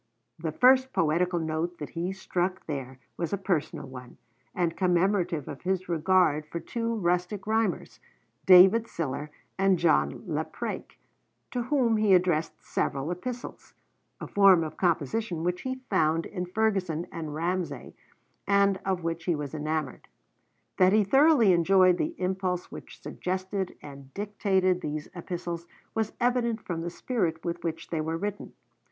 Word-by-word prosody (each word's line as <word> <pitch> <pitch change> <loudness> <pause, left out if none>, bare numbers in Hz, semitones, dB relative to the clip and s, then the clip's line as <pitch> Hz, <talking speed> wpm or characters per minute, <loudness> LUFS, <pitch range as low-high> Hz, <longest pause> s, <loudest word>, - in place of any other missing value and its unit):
The 160 -1 -2
first 260 - +4
poetical 175 +3 +1
note 160 +2 -2
that 150 - -6
he 175 +2 -2
struck 185 -1 -2
there 135 -4 -5 0.2
was 170 0 -3
a - - +1
personal 185 -6 -2
one, 125 -1 -11 0.4
and 170 -2 0
commemorative 180 -3 +1
of 145 - -7
his 185 0 -1
regard 170 -3 +2
for 170 - -5
two 230 +4 -3
rustic 180 0 -1
rhymers, 220 +1 -1 0.5
David 190 +5 +8
Sillar 150 - -4 0.3
and 195 -1 +4
John 170 -1 +2
Lapraik, - - -4 0.5
to 250 - -1
whom 240 -3 +2
he 210 -3 +5
addressed 175 -3 0
several 140 +3 -1
Epistles, 245 +8 -7 0.4
a - - -5
form 195 -4 +5
of 155 - -6
composition 175 - -1
which 180 +1 -1
he 260 0 -4
found 165 -3 +2
in 180 -3 -5
Ferguson 185 -5 0
and 155 -3 -5
Ramsay, 165 -4 -3 0.5
and 200 -1 +3
of 190 -3 -1
which 165 0 -3
he 175 - +1
was 145 -1 -5
enamored. 155 -2 -3 0.7
That 185 +1 +5
he 215 0 +5
thoroughly 270 - +5
enjoyed 180 +1 +4
the 325 +2 -1
impulse 185 -1 -2
which - - -10
suggested 185 +1 -4
and 140 -2 -11
dictated 190 -3 +1
these 150 0 -4
Epistles 170 -1 -5 0.3
was 220 -1 -1
evident 240 -2 +1
from 165 -2 -3
the 170 - -3
spirit 175 -5 -2
with 170 0 -3
which 165 -1 -4
they 160 -2 0
were 160 +1 -2
written. 205 +3 -5
180 Hz, 145 wpm, -28 LUFS, 165-200 Hz, 0.7 s, David